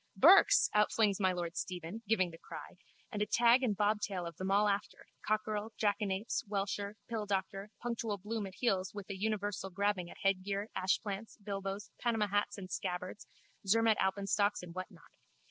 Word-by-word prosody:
Burke's! 375 - +7
outflings 210 -1 +3
my 190 -2 +3
lord 175 -2 -3
Stephen, 180 +4 -4
giving 185 -5 +2
the 165 - -11
cry, - - -9 0.4
and 210 -3 -3
a 210 - +1
tag 240 +2 +5
and 220 -6 0
bobtail 205 -3 0
of 170 - -5 0.2
all 200 +2 +4
them 205 - +4
after, 200 - -6 0.2
cockerel, 215 0 -1
jackanapes, 205 0 0
welsher, 200 0 -2
pilldoctor, 205 -2 -2
punctual 230 -3 -2
Bloom 210 +2 -3
at 190 - -11
heels 195 -5 0
with 205 -2 -6
a - - -3
universal 205 -1 -2
grabbing 195 -2 0
at - - -11
headgear, 195 +2 0
ashplants, 195 +3 -1
bilbos, 195 -1 -5
Panama 225 -3 +1
hats 205 +1 0
and 185 -2 -8
scabbards, 185 +1 -4 0.4
Zermatt 225 +1 +4
alpenstocks 200 +1 +1
and 170 -1 -8
what 185 +1 -5
not. - - -18
205 Hz, 165 wpm, -34 LUFS, 190-215 Hz, 0.4 s, Burke's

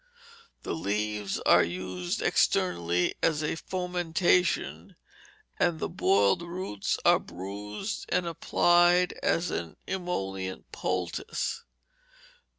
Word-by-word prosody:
The - - -3
leaves 105 -5 -2
are - - +6
used 90 0 -3
externally 85 0 +2
as 155 -2 +1
a 150 - 0
fomentation, 180 0 0 0.6
and 170 -3 +2
the - - -2
boiled 100 - +3
roots 170 - -3
are - - +6
bruised 105 - -6
and 180 0 +1
applied 175 +2 +3
as 170 +1 +1
an 80 -3 -4
emollient 95 - -4
poultice. 90 -1 -3
105 Hz, 95 wpm, -28 LUFS, -, 0.6 s, are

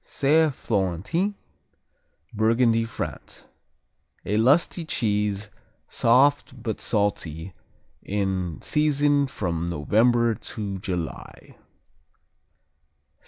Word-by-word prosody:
Saint 150 +1 +2
Florentin 105 - -1 1.0
Burgundy, 115 +1 +2
France 115 - -7 0.8
A 105 - -1
lusty 140 +9 +3
cheese, 105 -7 -1 0.4
soft 130 +2 +2
but 110 -2 -3
salty, 95 -5 -2 0.5
in 95 -4 -2
season 145 -1 +2
from 85 -8 -3
November 115 +9 +2
to 100 -3 -6
July. 90 -4 -6
110 Hz, 70 wpm, -25 LUFS, 95-135 Hz, 1.0 s, lusty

